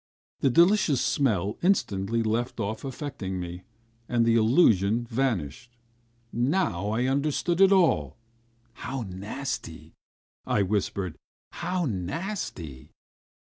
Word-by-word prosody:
The 135 Hz, -, +3 dB
delicious 170 Hz, -, +4 dB
smell 105 Hz, -7 st, 0 dB
instantly 115 Hz, -, +1 dB
left 115 Hz, +3 st, -1 dB
off 110 Hz, +1 st, -3 dB
affecting 130 Hz, -9 st, -5 dB
me, 90 Hz, 0 st, -6 dB, 0.5 s
and 120 Hz, -1 st, +2 dB
the 115 Hz, -, +3 dB
illusion 110 Hz, -, +4 dB
vanished.... 120 Hz, -, -2 dB, 0.6 s
Now 120 Hz, -, 0 dB
I 115 Hz, +4 st, 0 dB
understood 150 Hz, +6 st, 0 dB
it 195 Hz, 0 st, +7 dB
all! 165 Hz, -, +3 dB, 0.6 s
"How 130 Hz, +2 st, -5 dB
nasty," 95 Hz, -, -6 dB, 0.5 s
I 100 Hz, -, +1 dB
whispered, 95 Hz, -3 st, -2 dB, 0.3 s
"how 180 Hz, -1 st, -2 dB
nasty!" 90 Hz, -, -4 dB
115 Hz, 100 wpm, -27 LUFS, 95-140 Hz, 0.6 s, it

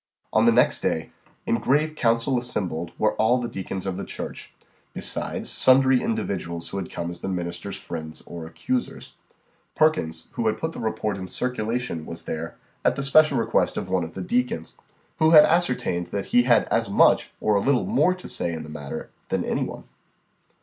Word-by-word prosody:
On -, -, +4 dB
the -, -, +7 dB
next -, -, +3 dB
day, -, -, -1 dB, 0.3 s
in 115 Hz, -, +1 dB
grave 150 Hz, +3 st, +1 dB
council 115 Hz, 0 st, +1 dB
assembled 90 Hz, -9 st, -3 dB
were 110 Hz, 0 st, +2 dB
all 110 Hz, +3 st, +3 dB
the 125 Hz, -1 st, -2 dB
deacons 95 Hz, -2 st, -5 dB
of 95 Hz, -1 st, -3 dB
the -, -, -4 dB
church, -, -, -7 dB, 0.4 s
besides -, -, 0 dB
sundry 130 Hz, 0 st, +5 dB
individuals 95 Hz, -, -3 dB
who 100 Hz, -, -5 dB
had 95 Hz, -3 st, -4 dB
come 85 Hz, 0 st, -4 dB
as 85 Hz, -, -9 dB
the -, -, -4 dB
minister's 90 Hz, +1 st, -4 dB
friends 80 Hz, -1 st, -7 dB
or 85 Hz, -2 st, -8 dB
accusers. 250 Hz, -, -4 dB, 0.6 s
Perkins, 120 Hz, -, +1 dB
who 115 Hz, -, -1 dB
had 110 Hz, -, +1 dB
put 160 Hz, -, -3 dB
the -, -, -8 dB
report 110 Hz, -2 st, -2 dB
in 95 Hz, -, -6 dB
circulation, 120 Hz, -7 st, -2 dB
was 85 Hz, -, -6 dB
there, 80 Hz, +1 st, -5 dB, 0.3 s
at -, -, +3 dB
the 140 Hz, -, -2 dB
special 145 Hz, 0 st, +5 dB
request 115 Hz, -, +1 dB
of 95 Hz, -, -4 dB
one 95 Hz, -2 st, +1 dB
of 80 Hz, -, -8 dB
the 95 Hz, -, -4 dB
deacons, 120 Hz, -7 st, -1 dB, 0.4 s
who 155 Hz, -, +5 dB
had 155 Hz, -2 st, +9 dB
ascertained 125 Hz, -, +1 dB
that 100 Hz, -, -3 dB
he 120 Hz, -, +7 dB
had 120 Hz, -3 st, +5 dB
as -, -, +1 dB
much, -, -, +4 dB
or 105 Hz, -, +1 dB
a 100 Hz, -, +3 dB
little 135 Hz, +1 st, +2 dB
more 195 Hz, -3 st, +2 dB
to 185 Hz, -, -10 dB
say, 85 Hz, -, -1 dB
in 80 Hz, -1 st, -5 dB
the 75 Hz, -, -10 dB
matter, 75 Hz, -2 st, -7 dB, 0.2 s
than -, -, -1 dB
any -, -, 0 dB
one. -, -, -7 dB
110 Hz, 190 wpm, -24 LUFS, 85-130 Hz, 0.6 s, had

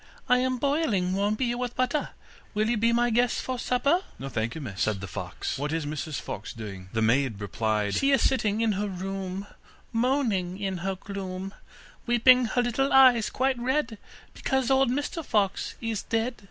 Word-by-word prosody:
I 250 Hz, 0 st, +4 dB
am 255 Hz, 0 st, 0 dB
boiling 260 Hz, -, +1 dB
warm 200 Hz, +2 st, +1 dB
beer 240 Hz, +1 st, -1 dB
with 245 Hz, -1 st, -3 dB
butter, 255 Hz, +4 st, 0 dB, 0.5 s
Will 215 Hz, +1 st, +2 dB
you -, -, +2 dB
be 230 Hz, +2 st, +2 dB
my 240 Hz, +1 st, +2 dB
guest 240 Hz, +2 st, +2 dB
for 255 Hz, -1 st, -3 dB
supper?' 280 Hz, +9 st, +2 dB, 0.2 s
'No, 135 Hz, -, -6 dB
thank 115 Hz, -2 st, -2 dB
you, 160 Hz, -, -5 dB
miss,' 105 Hz, -8 st, -6 dB
said 110 Hz, -3 st, +1 dB
the 100 Hz, -, -5 dB
fox, 95 Hz, -, -5 dB
'what 145 Hz, +1 st, -2 dB
is 160 Hz, -1 st, -1 dB
Mrs 150 Hz, 0 st, -4 dB
Fox 105 Hz, -, -6 dB
doing?' 95 Hz, -5 st, -8 dB
The 110 Hz, 0 st, 0 dB
maid 120 Hz, -1 st, +2 dB
replied: 105 Hz, 0 st, -1 dB
'She 275 Hz, -, +2 dB
is 275 Hz, -, +4 dB
sitting 220 Hz, -5 st, 0 dB
in 225 Hz, -1 st, +2 dB
her 205 Hz, +1 st, -1 dB
room, 190 Hz, +1 st, -4 dB, 0.5 s
Moaning 225 Hz, -7 st, 0 dB
in 195 Hz, -2 st, -2 dB
her 190 Hz, +2 st, -2 dB
gloom, 195 Hz, 0 st, -6 dB, 0.5 s
Weeping 250 Hz, +1 st, +6 dB
her 245 Hz, +2 st, +1 dB
little 255 Hz, +3 st, 0 dB
eyes 255 Hz, -4 st, +6 dB
quite 260 Hz, -1 st, 0 dB
red, 245 Hz, -3 st, -1 dB, 0.3 s
Because 265 Hz, -1 st, 0 dB
old 265 Hz, -1 st, +4 dB
Mr 290 Hz, +5 st, -2 dB
Fox 205 Hz, -7 st, 0 dB
is 225 Hz, -3 st, -2 dB
dead. 230 Hz, +2 st, -1 dB
215 Hz, 185 wpm, -27 LUFS, 175-250 Hz, 0.5 s, Weeping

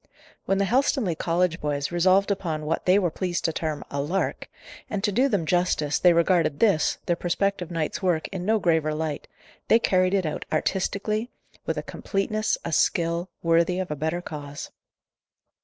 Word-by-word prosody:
When 195 Hz, -, +1 dB
the 200 Hz, -, +2 dB
Helstonleigh 240 Hz, -, +1 dB
College 175 Hz, 0 st, 0 dB
boys 145 Hz, 0 st, -2 dB
resolved 185 Hz, +3 st, +3 dB
upon 165 Hz, -6 st, -2 dB
what 165 Hz, +4 st, -2 dB
they 185 Hz, +2 st, +6 dB
were 180 Hz, -5 st, +1 dB
pleased 175 Hz, -2 st, -2 dB
to 165 Hz, -, +1 dB
term 155 Hz, -2 st, -3 dB
a 140 Hz, -, -1 dB
"lark" 175 Hz, +7 st, -2 dB, 0.4 s
and, 200 Hz, -1 st, -3 dB
to 205 Hz, -, +2 dB
do 255 Hz, +7 st, +2 dB
them 200 Hz, -8 st, 0 dB
justice, 165 Hz, -4 st, +1 dB
they 180 Hz, -, +6 dB
regarded 170 Hz, -3 st, +2 dB
this, 200 Hz, -9 st, +3 dB
their 175 Hz, -, +1 dB
prospective 180 Hz, +1 st, -1 dB
night's 165 Hz, 0 st, -2 dB
work, 175 Hz, -4 st, +1 dB
in 190 Hz, -2 st, -5 dB
no 220 Hz, +4 st, +2 dB
graver 160 Hz, -5 st, +1 dB
light 155 Hz, -2 st, -3 dB, 0.4 s
they 225 Hz, -, +6 dB
carried 185 Hz, -4 st, +2 dB
it 190 Hz, -3 st, +1 dB
out 155 Hz, -, -3 dB
artistically, 200 Hz, +7 st, -1 dB, 0.4 s
with -, -, -1 dB
a -, -, -3 dB
completeness, 215 Hz, +2 st, -1 dB
a 165 Hz, -, -3 dB
skill, 170 Hz, +2 st, +1 dB
worthy 170 Hz, +2 st, +3 dB
of 185 Hz, -3 st, -3 dB
a -, -, -1 dB
better 160 Hz, +4 st, -2 dB
cause. 145 Hz, -3 st, -7 dB
175 Hz, 175 wpm, -25 LUFS, 160-195 Hz, 0.4 s, they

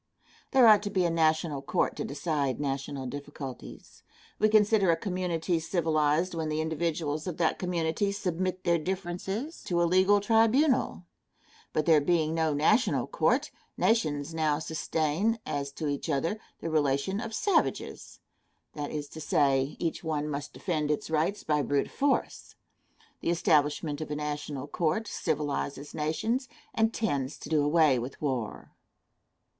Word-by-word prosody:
There 260 Hz, -2 st, +6 dB
ought 210 Hz, -2 st, +7 dB
to 205 Hz, -, -3 dB
be 185 Hz, -3 st, +1 dB
a 170 Hz, -, +1 dB
national 155 Hz, -3 st, +1 dB
court 140 Hz, -, 0 dB
to -, -, -2 dB
decide 140 Hz, -2 st, -2 dB
national 135 Hz, -1 st, -3 dB
difficulties. 135 Hz, -, -8 dB, 0.4 s
We 215 Hz, -, +4 dB
consider 210 Hz, -2 st, +4 dB
a 165 Hz, -, +5 dB
community 180 Hz, -2 st, -1 dB
civilized 160 Hz, 0 st, +1 dB
when 160 Hz, -2 st, -2 dB
the 155 Hz, 0 st, -1 dB
individuals 160 Hz, -1 st, -2 dB
of 175 Hz, -, -4 dB
that 165 Hz, -2 st, +1 dB
community 175 Hz, +2 st, 0 dB
submit 185 Hz, -1 st, -2 dB
their 170 Hz, -1 st, +2 dB
differences 190 Hz, -, -4 dB
to 175 Hz, -1 st, 0 dB
a -, -, +4 dB
legal 185 Hz, +4 st, +4 dB
tribunal; 225 Hz, +3 st, +3 dB, 0.7 s
but 155 Hz, -, 0 dB
there 160 Hz, -3 st, +5 dB
being 160 Hz, 0 st, +1 dB
no 160 Hz, -1 st, +1 dB
national 185 Hz, -, +2 dB
court, -, -, +1 dB, 0.3 s
nations 155 Hz, -9 st, +1 dB
now 155 Hz, -2 st, +1 dB
sustain, 160 Hz, +6 st, -1 dB
as 140 Hz, -1 st, -3 dB
to 155 Hz, -, -4 dB
each 145 Hz, +3 st, -3 dB
other, 165 Hz, +9 st, 0 dB, 0.2 s
the 165 Hz, -, -3 dB
relation 145 Hz, +5 st, +1 dB
of 225 Hz, -1 st, -5 dB
savages 375 Hz, -, -1 dB, 0.5 s
that 145 Hz, -1 st, -4 dB
is 150 Hz, -1 st, -4 dB
to 160 Hz, -, -9 dB
say, 140 Hz, -1 st, +2 dB
each 165 Hz, 0 st, -3 dB
one 150 Hz, -2 st, -1 dB
must 145 Hz, -1 st, -4 dB
defend 155 Hz, -4 st, -2 dB
its 150 Hz, +1 st, -2 dB
rights 160 Hz, +6 st, 0 dB
by 150 Hz, -1 st, +1 dB
brute 140 Hz, 0 st, 0 dB
force. 285 Hz, 0 st, -1 dB, 0.6 s
The -, -, -2 dB
establishment 150 Hz, -2 st, +1 dB
of 155 Hz, -, -5 dB
a 150 Hz, -, -2 dB
national 145 Hz, -2 st, -4 dB
court 165 Hz, +8 st, -1 dB
civilizes 145 Hz, -4 st, -3 dB
nations, 220 Hz, -, -1 dB, 0.2 s
and 225 Hz, 0 st, +2 dB
tends 145 Hz, -, -2 dB
to -, -, -9 dB
do 155 Hz, -2 st, +3 dB
away 150 Hz, -3 st, +4 dB
with 125 Hz, +3 st, -6 dB
war. 130 Hz, -7 st, -3 dB
160 Hz, 150 wpm, -29 LUFS, 145-185 Hz, 0.7 s, ought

